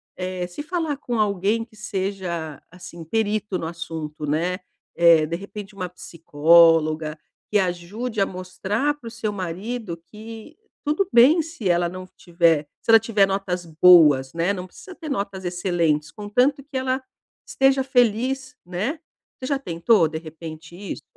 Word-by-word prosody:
eh, 185 -1 -4
se 180 +11 -7
falar 320 -2 -2
com 245 -5 -3
alguém 210 +2 +1
que 225 - -23
seja, 190 -7 -4
assim, 175 -1 -10
perito 210 +1 -1
no 165 - -4
assunto, 160 -2 -6
né. 170 +5 -1 0.4
Eh, 170 -2 +6
de 165 +2 -3
repente 200 +2 -9
uma 185 -2 -4
psicóloga, 160 -1 +3 0.3
que 210 - +4
ajude 195 +6 -2
a - - +4
mostrar 190 +9 -2
pro 230 -2 -9
seu 225 -2 -3
marido 190 +2 -5
que, 220 - -12 0.3
tudo 300 +7 +1
bem 260 +8 +6
se 320 - -5
ela 175 0 +2
não 185 +1 -8
tiver 170 -3 +2 0.2
se - - -12
ela 225 - +10
tiver 215 -3 +2
notas 190 -2 -2
boas, 155 -5 +6
né. 170 +4 0
Não 180 -2 -5
precisa 370 - -13
ter 315 -2 -8
notas 200 -7 -3
excelentes 175 -4 0
contanto 250 - 0
que 270 -1 -6
ela 260 0 -1 0.4
esteja 270 0 +2
feliz, 255 +1 +1
né. 200 - -3 0.4
Você 255 - -4
já 280 -1 0
tentou, 170 -3 +2
de 160 +1 -5
repente, 160 0 -10
isso? 200 +1 -7
190 Hz, 155 wpm, -23 LUFS, 170-230 Hz, 0.4 s, ela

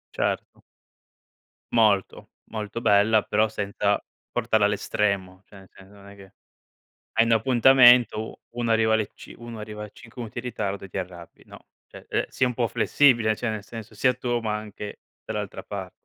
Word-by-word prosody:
Certo. - - -2 1.1
Molto, 105 -4 +2 0.2
molto 110 +1 -5
bella 105 +1 +4
però 110 +1 +2
senza 100 -1 -1 0.3
portarla 110 -3 +2
all'estremo, 100 -2 -1
cioè 100 - -15
nel 95 - -17
senso 95 +1 -17
non 100 -1 -15
è 100 - -13
che 100 -1 -16 0.8
hai 115 - +6
un 115 - +1
appuntamento, 120 -1 +6
u - - -10 0.2
uno 115 -1 -1
arriva 110 0 +3
alle 110 -2 0
c - - -13
uno 120 -1 -9
arriva 105 0 -7
5 115 +4 -13
minuti 115 0 -7
in 120 - -5
ritardo 100 -5 -3
e - - -9
ti 95 - -5
arrabbi, 90 -2 -9
no, - - -13 0.3
cioè, - - -14
ehm, - - 0
sii 130 - +1
un 125 - -2
po' 120 -2 0
flessibile, 120 -6 +3
cioè 120 - -3
nel 110 -2 -5
senso 110 +2 -10
sia 125 +4 +2
tu 120 -1 -1
ma 110 -1 -2
anche 105 -1 -8 0.2
dall'altra - - -5
par 95 -3 -6
110 Hz, 175 wpm, -25 LUFS, 100-115 Hz, 1.1 s, hai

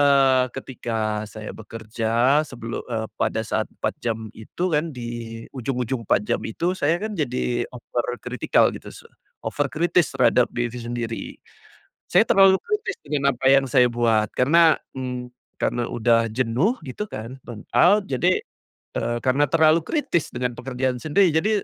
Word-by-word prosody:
eee, 135 -2 +5
ketika 110 -5 -3
saya 110 -1 -8
bekerja 115 +5 0
sebelu 120 -5 -6
eee, 110 -1 -2
pada - - 0
saat - - -1
4 - - -3
jam 110 -2 -3
itu 110 +11 -5
kan, 155 +2 +1
di 115 -1 -6
ujung-ujung 125 -1 -2
4 100 - +3
jam - - 0
itu, 170 +11 -1
saya 165 -2 +1
kan 215 +2 -4
jadi 125 -6 -1
over 125 0 -4
critical 125 -1 +2
gitu - - -9
su - - -13 0.4
over 145 -1 -1
kritis 170 +3 +2
terhadap 125 - +4
diri 120 0 -2
sendiri. 120 -1 -4 0.9
Saya - - +6
terlalu 195 -1 +6
kritis 425 -2 -2
dengan 140 -2 0
apa 125 - -6
yang 135 0 +4
saya 125 -1 +5
buat, 115 -3 +1
karena, 160 +5 +5 0.2
mmm, 125 -1 -4 0.3
karena 120 -1 0
udah 115 0 +2
jenuh 130 - +1
gitu 130 +11 -4
kan, 120 - -8
burnout, 175 - +2
jadi, 175 +8 +1 0.6
eee, 120 +1 -1
karena 130 +3 +3
terlalu 160 +2 +4
kritis 175 - -1
dengan 125 0 -2
pekerjaan 125 -1 -2
sendiri. 180 +5 +3
Jadi, 205 +7 +2
125 Hz, 150 wpm, -23 LUFS, 115-150 Hz, 0.9 s, Saya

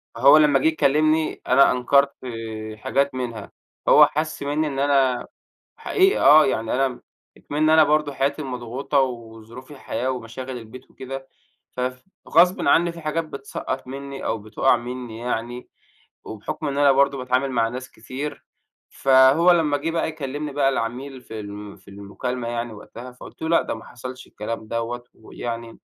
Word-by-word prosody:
فهو 140 +2 +7
لمّا 150 -3 +5
جه 145 - +2
يكلِّمني 155 +1 +2
أنا 135 +2 +6
أنكرت 140 +3 +3
آآ 110 -3 -6
حاجات 140 +5 0
منها، 115 -5 -5 0.4
هو - - +8
حَسّ 155 0 -3
مِنّي 150 +2 0
إن 135 -2 -4
أنا 135 -3 +2 0.5
حقيقة 385 0 +2
آه، 155 +1 +8
يعني 115 -3 -1
أنا 130 -1 0 0.4
إكمن 155 +2 0
أنا 160 0 +7
برضه 150 -1 +1
حياتي 140 +3 -1
مضغوطة 130 +2 -2
وظروف 115 0 -5
الحياة 130 -3 -4
ومشاغل 125 +1 -6
البيت 120 +3 -12
وكده، 135 0 -8 0.4
فف 125 0 -4 0.3
غصبًا 180 -4 +4
عنّي 170 +3 +4
في 170 0 -11
حاجات 155 +2 -1
بتسقّط 135 -2 -6
منّي 140 +1 -7
أو 110 - 0
بتُوقَّع 110 +5 +1
مِنّي 120 -1 -7
يعني، 120 +1 -4 0.6
وبحكم 110 +8 -5
إن 140 0 -3
أنا 145 -1 +5
برضه 140 +1 +3
باتعامل 130 +1 0
مع 115 -2 +2
ناس 130 +2 -7
كتير، 130 +6 -7 0.4
فهو 135 +6 +5
لمّا 155 -4 +2
جه 160 +3 -3
بقى 165 -1 -1
يكلمني 145 -1 -5
بقى 140 -1 +2
العميل 130 +2 -4
في 110 -2 -8
ال 105 0 -9
في - - -26
المكالمة 110 +5 -5
يعني 120 -1 -3
وقتها، 120 +4 -10
فقُلت 125 - -14
له 160 - -2
لأ، 165 - +4
ده - - -4
ما 110 - -11
حصلش 130 +1 -9
الكلام 110 +1 -6
دوّة، 115 +2 -3
ويعني 115 +1 -7
130 Hz, 160 wpm, -23 LUFS, 120-145 Hz, 0.6 s, هو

